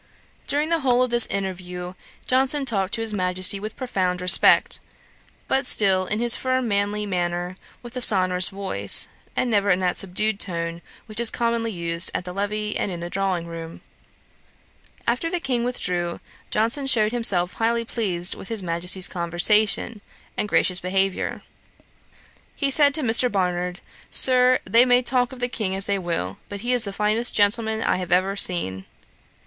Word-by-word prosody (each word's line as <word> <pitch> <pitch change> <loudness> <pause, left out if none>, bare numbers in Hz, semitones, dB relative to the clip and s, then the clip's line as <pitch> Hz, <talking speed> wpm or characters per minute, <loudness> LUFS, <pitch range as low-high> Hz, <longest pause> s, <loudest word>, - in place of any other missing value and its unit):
During 295 +2 0
the 335 -1 0
whole 255 -3 +1
of 250 - -4
this 240 -1 +4
interview, 180 -2 -6 0.3
Johnson 270 +2 +2
talked 200 -3 -1
to 225 - -5
his 225 -1 +3
Majesty 185 0 +1
with 215 +2 -8
profound 185 -9 -3
respect, 180 0 +5 0.7
but 265 -1 -1
still 190 -3 +3
in 215 - -2
his 240 0 +6
firm 255 -1 -2
manly 205 0 -2
manner, 175 -1 -4 0.3
with 240 +1 -12
a 250 - -4
sonorous 185 -4 +5
voice, 190 - +2 0.3
and 245 - -2
never 205 -1 0
in 180 - +3
that 180 -1 -1
subdued 195 +3 0
tone 170 -2 -4 0.2
which 215 0 -7
is 235 -1 +6
commonly 230 -1 -2
used 170 -2 0
at - - -4
the 180 - -7
levee 210 +2 -3
and 200 - -3
in 175 - -6
the 175 +1 -7
drawing 190 -3 -2
room. 165 -1 -10 1.2
After 245 +8 -2
the 355 - -3
King 255 -6 -3
withdrew, 180 -8 -3 0.3
Johnson 230 +6 -1
shewed 215 -4 +3
himself 190 -7 -1
highly 230 +1 -2
pleased 185 -7 +1
with - - -10
his 225 -4 0
Majesty's 180 +2 +1
conversation, 205 +5 +1 0.3
and 210 - -3
gracious 180 -2 +3
behaviour. 190 +1 -3 1.1
He 280 -2 -2
said 285 0 +4
to 310 - +2
Mr. 245 +1 +2
Barnard, 180 -2 -3 0.3
'Sir, 255 0 +4
they 235 +2 +4
may 250 0 +2
talk 245 0 0
of 260 - -12
the 245 - -2
King 210 -6 -4
as 195 0 +4
they 200 -1 -2
will; 165 - -5
but 200 -1 -8
he 245 +2 -1
is 245 -3 +1
the 200 - -5
finest 215 +4 +1
gentleman 220 +1 +1
I - - 0
have 180 0 -7
ever 185 +2 +1
seen.' 130 - 0
200 Hz, 170 wpm, -22 LUFS, 180-235 Hz, 1.2 s, his